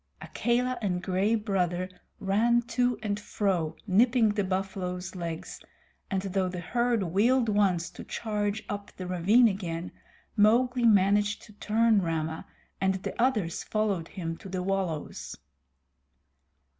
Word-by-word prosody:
Akela 245 +1 0
and 180 -3 -1
Gray 195 +4 +1
Brother 185 -4 0 0.3
ran 230 +5 +2
to 245 0 0
and 205 -1 -1
fro 190 -6 -1
nipping 225 +3 +4
the 205 0 0
buffaloes' 185 -1 -3
legs, 170 -3 -5 0.5
and 190 -1 -1
though 190 -1 0
the 180 0 -5
herd 235 +4 0
wheeled 230 +8 +2
once 190 -5 +1
to - - -9
charge 210 -1 -2
up 200 0 -5
the 185 - -5
ravine 190 +7 +4
again, 180 -4 -3 0.4
Mowgli 240 +3 +4
managed 205 -1 +3
to 210 - -15
turn 220 +1 +2
Rama, 160 -2 -2 0.3
and 190 0 +2
the 190 +4 -4
others 215 -10 +1
followed 205 -6 -1
him 165 -3 -5
to 195 - -10
the 185 -1 -3
wallows. 185 -5 -3
200 Hz, 130 wpm, -28 LUFS, 180-220 Hz, 0.5 s, nipping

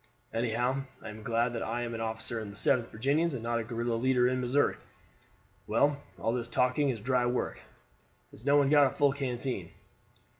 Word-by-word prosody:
Anyhow, 120 +4 0 0.2
I 110 - -6
am 110 +1 -9
glad 115 +2 0
that 115 - -3
I 120 +2 -2
am 120 -1 -4
an 115 - -4
officer 110 +1 -3
in 110 -2 -6
the 100 - -10
7th 115 +3 +2
Virginians 140 +7 0
and 115 - -5
not 120 0 0
a - - -2
guerrilla 120 +1 -2
leader 125 +1 +3
in 130 0 0
Missouri. 125 +4 +2 0.9
Well, 140 +6 +2 0.2
all 115 - 0
this 120 -1 -2
talking 125 +4 +2
is 120 -4 -2
dry 125 +2 +1
work. 120 - -2 0.7
Has 110 - -15
no 140 +2 +4
one 140 -1 +4
got 145 -2 +7
a - - 0
full 140 +1 +2
canteen?" 125 -8 -3
120 Hz, 195 wpm, -30 LUFS, 115-135 Hz, 0.9 s, got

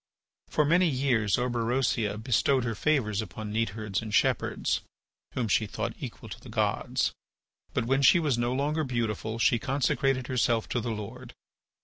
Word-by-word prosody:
For 150 - +2
many 175 +4 +4
years 125 -7 +1
Orberosia 120 -3 0
bestowed 125 +3 +2
her 115 -1 -1
favours 110 -4 +1
upon 105 +2 -7
neatherds 110 -2 -1
and 110 -1 -6
shepherds, 100 - +1 0.5
whom 125 -3 0
she 110 0 +2
thought - - -3
equal - - -7
to - - -8
the - - -13
gods. - - 0 0.6
But - - +1
when 135 +3 +2
she 140 +6 +7
was 150 -6 +1
no 120 +1 0
longer 145 +4 0
beautiful 115 -4 -2
she 115 0 +3
consecrated 135 0 0
herself 120 -3 +1
to 120 - 0
the 120 - -3
Lord. 115 +3 -7
120 Hz, 155 wpm, -28 LUFS, 110-135 Hz, 0.6 s, she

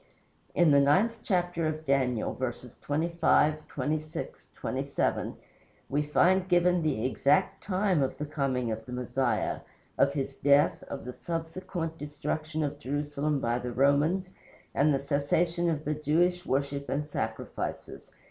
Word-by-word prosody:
In 175 -3 +5
the 140 - +6
ninth 190 +12 +3
chapter 175 -3 0
of 155 0 -4
Daniel, 130 -5 +1
verses 125 -1 -5
25, 155 0 +2
26, 155 +2 -4
27, - - -1 0.5
we 145 +2 +1
find 180 +5 +3
given 175 0 +4
the 140 -8 0
exact 140 +7 +2
time 185 -4 +1
of 135 - -1
the 150 - -3
coming 135 -5 -1
of 110 0 -4
the - - -8
Messiah, 125 +1 0 0.4
of 140 0 +4
his 140 -1 -2
death, 145 +2 +3
of 140 - -6
the 125 - -5
subsequent 165 +2 -4
destruction 155 +2 -3
of 145 0 -3
Jerusalem 145 +1 -1
by 120 -1 0
the 125 0 -4
Romans, 145 +9 +2 0.4
and 150 +2 +3
the 140 - +3
cessation 160 +5 +1
of 155 -2 -2
the 150 - +1
Jewish 175 +5 +1
worship 140 +1 -1
and 145 +2 -1
sacrifices. 150 - -5
150 Hz, 140 wpm, -29 LUFS, 140-170 Hz, 0.5 s, the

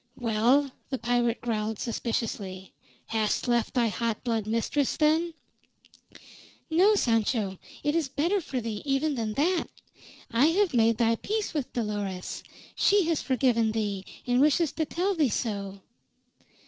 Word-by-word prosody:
"Well?" 245 +4 +2 0.2
the 265 - -2
pirate 240 0 0
growled 220 -2 -2
suspiciously. 205 -5 -3 0.3
"Hast 220 +2 -1
left 240 0 +1
thy 235 -2 +3
hot 230 0 -2
blood 225 -4 -1
mistress, 230 +5 0
then?" 315 +2 +2 1.4
"No, 385 +6 +5
Sancho. 225 - +1 0.2
It 295 +1 +1
is 320 -5 0
better 340 +9 0
for 275 -5 -3
thee 220 -3 -4
even 285 +2 +1
than 225 -4 -2
that. 335 +8 +1 0.7
I 240 +6 +4
have 365 +1 +2
made 230 -2 +3
thy 230 -1 +2
peace 425 - -2
with 290 -5 -3
Dolores. 205 -5 -3 0.3
She 405 -1 +4
has 325 - +1
forgiven 240 -4 +2
thee, 205 -3 -2 0.2
and 245 +1 +2
wishes 300 +2 +3
to 320 - -2
tell 365 +6 -1
thee 310 -7 +2
so." 200 -3 -3
240 Hz, 140 wpm, -27 LUFS, 220-300 Hz, 1.4 s, No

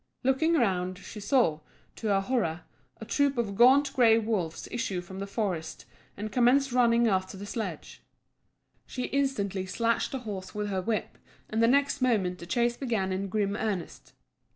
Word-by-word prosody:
Looking 270 +6 +2
round, 185 - 0
she 210 +2 -10
saw, 205 - +2 0.4
to 225 - -4
her 195 -1 +2
horror, 195 -7 -1 0.4
a - - -7
troop 285 -2 +1
of 225 -4 -1
gaunt 270 +5 +5
grey 230 -3 +5
wolves 210 -8 -2
issue 230 -6 -2
from 190 +2 -9
the 200 - -4
forest 190 -6 -3 0.3
and 210 +1 -5
commence 250 +3 +3
running 235 -1 +4
after 190 -2 -1
the 200 - -7
sledge. 220 +2 -6 0.9
She 250 - -4
instantly 205 -10 -1
slashed 230 +4 0
the 270 - -2
horse 205 -6 -7
with 210 0 -2
her 190 -2 -1
whip, 215 +2 -3 0.3
and 220 +1 0
the 230 - +5
next 280 +2 +2
moment 195 -8 +1
the 170 - -9
chase 240 +2 +1
began 225 -8 -1
in 195 +1 -2
grim 200 0 0
earnest. 210 -5 -4
220 Hz, 170 wpm, -28 LUFS, 190-245 Hz, 0.9 s, gaunt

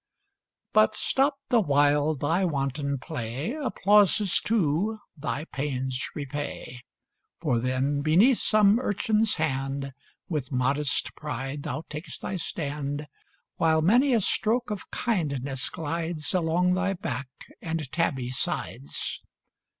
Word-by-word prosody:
But, - - +5
stopped 275 +1 0
the 245 - +5
while 145 -3 +3
thy 160 +7 +1
wanton 140 -3 -1
play, 130 - -4
Applauses 210 - +3
too 205 +1 +1 0.2
thy 150 0 -3
pains 130 -4 -3
repay: 145 -3 -5 0.6
For 130 -8 +1
then, 130 +4 0
beneath 190 - +5
some 215 0 +5
urchin's 220 -1 +1
hand 135 -2 -2 0.3
With 150 -6 -3
modest 135 +2 0
pride 140 -1 -4
thou 140 +3 -4
takest 155 +2 -8
thy 190 - -2
stand, 145 -3 -4 0.5
While 160 -1 +3
many 245 - +4
a 225 - +3
stroke 225 +5 +1
of 205 - -5
kindness 140 - -1
glides 160 +1 -3
Along 180 +1 +2
thy 195 +1 +1
back 175 -8 -4 0.3
and 160 -4 -3
tabby 135 -7 0
sides. 75 - -2
155 Hz, 115 wpm, -27 LUFS, 140-190 Hz, 0.6 s, But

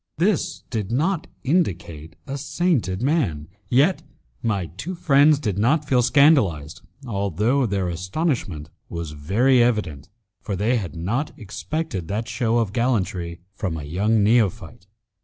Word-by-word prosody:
This 180 +2 0
did 110 -3 -3
not 165 +7 0 0.2
indicate 85 - -1
a 135 - -5
sainted 140 - -1
man; 125 - 0 0.2
yet 145 +9 +3 0.4
my 100 -5 -1
two 95 - -6
friends 145 -2 +4
did 105 -9 -2
not 145 +7 +2
feel 125 -3 +3
scandalized, 120 - +3 0.2
although 105 - 0
their 100 -3 -1
astonishment 90 - -2 0.2
was 85 -3 -5
very 110 - +2
evident, 90 - 0 0.3
for 100 - -3
they 110 +6 +1
had 95 -6 -5
not 110 - -2
expected 110 - -4
that 110 +5 -3
show 115 +1 0
of 110 -4 0
gallantry 95 -8 -1
from 95 -5 -3
a 75 - -6
young 100 +8 +1
neophyte. 100 -6 +1
110 Hz, 135 wpm, -23 LUFS, 90-140 Hz, 0.4 s, friends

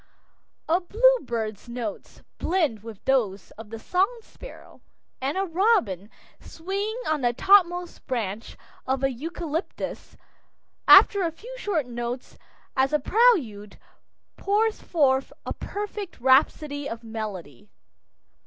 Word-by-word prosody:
A 335 +3 +3
bluebird's 255 - +1
notes 245 +5 -6 0.2
blend 320 - 0
with 220 -2 -11
those 210 -8 0
of 215 0 -12
the 225 - -6
song 365 - +1 0.2
sparrow, - - -14 0.4
and 275 +6 -1
a 390 - +1
robin 330 - +1 0.3
swinging 400 +7 -4
on 310 -2 0
the 240 -1 +2
topmost 355 - +3
branch 225 -4 -4 0.3
of 265 0 -1
a 270 - +2
eucalyptus, 325 +5 -5 0.7
after 400 - +8
a 340 -2 0
few 465 +10 -11
short 395 - -1
notes 240 +1 -6 0.4
as 265 +2 +2
a - - +5
prelude, 290 - +2 0.6
pours 430 +2 +1
forth 270 -5 +1
a - - -3
perfect 410 -2 -6
rhapsody 285 +2 +2
of 230 +1 -7
melody. 200 - -7
285 Hz, 115 wpm, -25 LUFS, 230-380 Hz, 0.7 s, after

